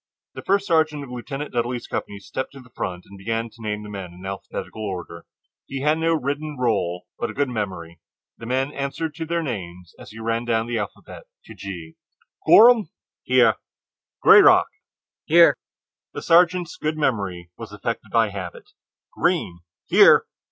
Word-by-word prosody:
The - - -8
first 200 +1 +1
sergeant 155 -4 +1
of 130 - -10
Lieutenant 135 +4 -6
Dudley's 120 0 -2
company 100 - -5
stepped 130 +7 -6
to 140 - -11
the 125 -2 -17
front 90 -5 -5
and 100 0 -14
began 115 +3 -3
to 115 +1 -17
name 105 -1 -3
the 105 - -9
men 95 -3 -7
in 90 +2 -12
alphabetical 95 +2 -6
order. 90 -4 -6 0.4
He 135 -1 -5
had 150 +3 +2
no 165 0 +2
written 145 +1 -3
roll, 95 -8 -1
but 120 - -2
a - - -8
good 140 -1 0
memory. 95 -7 -5 0.4
The 115 - -8
men 130 +3 0
answered 140 +3 -3
to 160 +1 -6
their 170 0 -1
names 90 - -6
as - - -11
he 110 - -13
ran 115 +1 -1
down 115 -1 +1
the 120 -1 -2
alphabet 105 - -8 0.2
to - - -11
G. 85 -5 -8 0.5
"Gorham." 230 -1 +7 0.3
"Here!" - - +4 0.7
"Grayrock." 400 -4 +8 0.6
"Here!" - - +6 0.6
The - - -5
sergeant's 175 0 +3
good 155 +1 -2
memory 100 - -2
was - - -9
affected - - -4
by 115 -2 +3
habit: 95 -4 -8 0.4
"Greene." 85 -1 0 0.3
"Here!" - - +6
120 Hz, 165 wpm, -23 LUFS, 100-150 Hz, 0.7 s, Grayrock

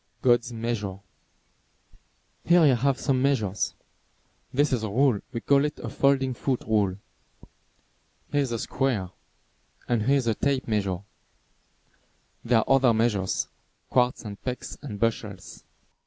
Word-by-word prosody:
"_ - - -41
GOD'S 120 -2 +3
MEASURE 110 -4 -3 1.5
Here 175 +1 +6
I 155 - +6
have 135 +2 +2
some 130 -3 +1
measures. 110 -8 0 0.8
This 145 +1 +2
is 120 - +1
a 110 - -3
rule, 125 0 +3
we 115 -2 -4
call 140 0 +3
it 150 0 -2
a - - -6
folding 135 -2 +2
foot 130 +1 -1
rule. 100 -4 +1 1.3
Here 145 - +2
is 135 -3 -2
a 115 - -1
square. 110 -7 -1 0.8
And 120 -2 +1
here 135 +6 +3
is 130 - -1
a 115 - +2
tape 135 +3 -1
measure. 100 -5 -1 1.4
There 120 0 +3
are 110 - +2
other 135 -3 +4
measures, 105 -4 0 0.4
quarts 125 -1 +2
and 100 -1 -8
pecks 125 -1 -5
and 115 -8 -7
bushels. 110 -4 -3
120 Hz, 140 wpm, -26 LUFS, 105-135 Hz, 1.5 s, Here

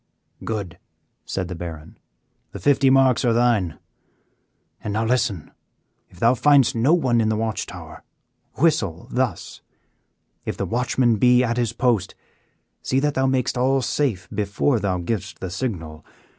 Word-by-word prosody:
"Good," 100 -6 -5 0.5
said 95 -2 -3
the 90 - -6
Baron, 80 -3 -8 0.6
"the - - -6
fifty 140 -1 +3
marks 130 -2 +4
are 120 -2 +3
thine. 115 -8 +1 1.1
And 105 - -3
now 110 +2 0
listen, 115 -8 -1 0.6
if 90 - -19
thou 115 +4 +4
findest 140 -1 +4
no 120 +6 +2
one 125 -8 +2
in 110 - +1
the 110 - +1
watch 110 0 -2
tower, - - -10 0.5
whistle 120 - 0
thus; 125 -3 -2 0.8
if - - -4
the - - -2
watchman 120 0 +1
be 125 +3 +4
at 120 -1 -1
his 120 -2 0
post, 120 -5 0 0.7
see 130 - 0
that 145 +1 0
thou 135 0 +1
makest 130 -2 0
all 135 +1 +2
safe 110 -13 -1
before 105 +5 0
thou 95 -2 -1
givest 90 +3 -4
the 95 - -5
signal. 80 - -5
115 Hz, 150 wpm, -22 LUFS, 100-130 Hz, 1.1 s, marks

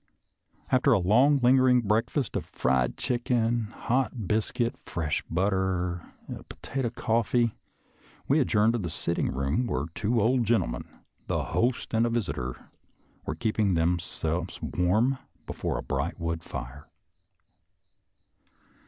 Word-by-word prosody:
After 130 +1 +4
a - - +5
long, 125 +11 +4
lingering 125 0 +5
breakfast 115 +5 0
of - - -1
fried 65 -1 0
chicken, 120 -2 0
hot 120 +1 -1
biscuit, 110 +3 0
fresh 80 -3 -2
butter, 90 -1 0 0.3
and - - -8
potato 130 -3 -3
coffee, 115 0 +1 0.7
we 145 +3 +4
adjourned 115 -4 +3
to 120 - 0
the 90 -5 -3
sitting 85 +2 -1
room, 70 - 0
where 70 - -1
two 115 +6 0
old 120 +4 +3
gentlemen 100 - 0 0.2
— - - -41
the - - 0
host 120 +1 -1
and 115 +1 +3
a - - 0
visitor 85 - -3 0.2
— - - -36
were - - -2
keeping 110 -4 +1
themselves 85 0 -1
warm 110 +9 +1 0.3
before - - -3
a - - -4
bright 70 +5 -2
wood 85 0 -2
fire. 65 +2 -8
110 Hz, 130 wpm, -28 LUFS, 85-120 Hz, 0.7 s, a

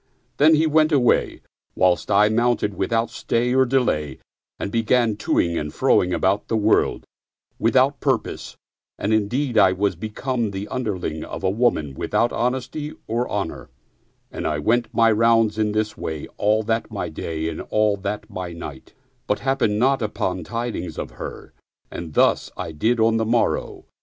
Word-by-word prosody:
Then 155 +2 +6
he 155 +1 +3
went 155 0 +3
away, 130 -5 +2 0.3
whilst 90 -1 +2
I 105 - +5
mounted 110 -2 +1
without 115 +4 -1
stay 120 +2 0
or 130 0 +4
delay 75 - 0 0.4
and 100 - -4
began 115 0 +2
to - - 0
ing 85 -1 +1
and 75 - -4
f - - -19
ro - - +5
ing 90 - -2
about 95 +3 +1
the 115 - 0
world 110 0 +2 0.5
without - - +3
purpose, - - -2 0.4
and 105 +2 -1
indeed 120 +5 +1
I 95 -1 +5
was 100 0 0
become 115 +4 -3
the 100 +1 -5
underling 95 -11 -3
of - - -7
a 95 - +2
woman 100 - +1
without 120 - 0
honesty 130 +5 -2
or 120 +2 -1
honor; 95 -10 -4 0.6
and - - -4
I 75 - -1
went 115 +10 +1
my 115 -1 +4
rounds 115 -1 +3
in 105 -1 +1
this 110 0 -1
way 80 -2 -5
all 110 +1 +2
that 115 +1 -1
my - - -4
day 80 -1 -4
and 80 - -4
that 105 -1 -1
my 90 -2 -6
night, 75 -5 -9 0.3
but 105 - +1
happened 135 -6 +1
not 135 +3 +2
upon 95 -4 -2
tidings 115 -7 -4
of - - -5
her; - - -9 0.4
and 80 -3 -7
thus - - +3
I 80 - -4
did 110 +10 0
on 115 0 +3
the 110 - 0
morrow. 115 +1 0
110 Hz, 170 wpm, -22 LUFS, 95-120 Hz, 0.6 s, Then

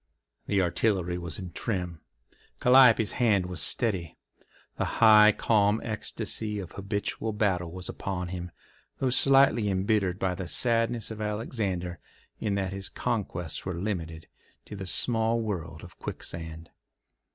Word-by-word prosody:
The 100 -2 +2
artillery 90 0 0
was 85 -4 -6
in 90 -2 -7
trim. 90 -5 -4 0.6
Calliope's 125 -4 +6
hand 105 -7 +2
was 90 -3 -3
steady. 90 - -1 0.6
The - - 0
high, 110 -1 +8
calm 105 0 +2
ecstasy 110 -1 -3
of 95 -4 -6
habitual 100 +2 -3
battle 95 -5 0
was 90 +1 -7
upon 90 -2 -4
him, 90 -1 -5 0.5
though 130 -2 0
slightly 135 -5 +4
embittered 95 -1 +1
by 95 -2 -1
the 90 0 -6
sadness 115 +1 +2
of 110 -1 -6
Alexander 105 -5 -3 0.4
in 105 -2 -1
that 95 -1 -2
his 95 0 -3
conquests 95 -9 -2
were 95 -2 -4
limited 85 -4 -4 0.4
to - - -9
the 95 -1 -6
small 115 +3 +2
world 85 -8 -4
of 90 - -13
Quicksand. 80 0 -6
100 Hz, 135 wpm, -28 LUFS, 90-110 Hz, 0.6 s, high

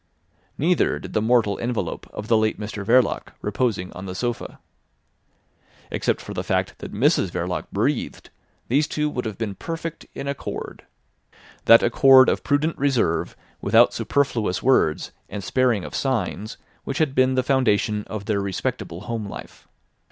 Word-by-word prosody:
Neither 170 +4 +2
did - - -9
the 110 - +1
mortal 110 -3 +2
envelope 120 -1 -3
of 105 - -7
the 115 - +4
late 110 -1 +1
Mr 105 -1 -5
Verloc 120 +4 +2
reposing 105 -3 -1
on 95 +1 -8
the 90 - -6
sofa. 120 +3 -3 1.3
Except - - 0
for - - -8
the - - -3
fact - - -1
that - - -7
Mrs - - +2
Verloc - - -3
breathed - - -2 0.4
these 145 +5 +2
two 150 0 -1
would 125 -3 -3
have 110 -3 -4
been 110 -3 -3
perfect 165 - -6
in 140 - -5
accord: 140 -1 -6 0.8
that 115 - +8
accord 130 +2 +7
of - - -1
prudent 150 +3 0
reserve 130 -12 0 0.2
without - - +5
superfluous 115 -10 0
words, 125 -12 +2 0.2
and 100 -2 -6
sparing 125 -3 +1
of - - -8
signs, 115 -5 -2 0.3
which 135 - -4
had 155 -4 +1
been 130 -1 +3
the 130 - +2
foundation 110 -5 +1
of 105 -2 -6
their 100 -1 0
respectable 95 -2 -3
home 110 -1 -4
life. - - -10
120 Hz, 155 wpm, -23 LUFS, 105-135 Hz, 1.3 s, that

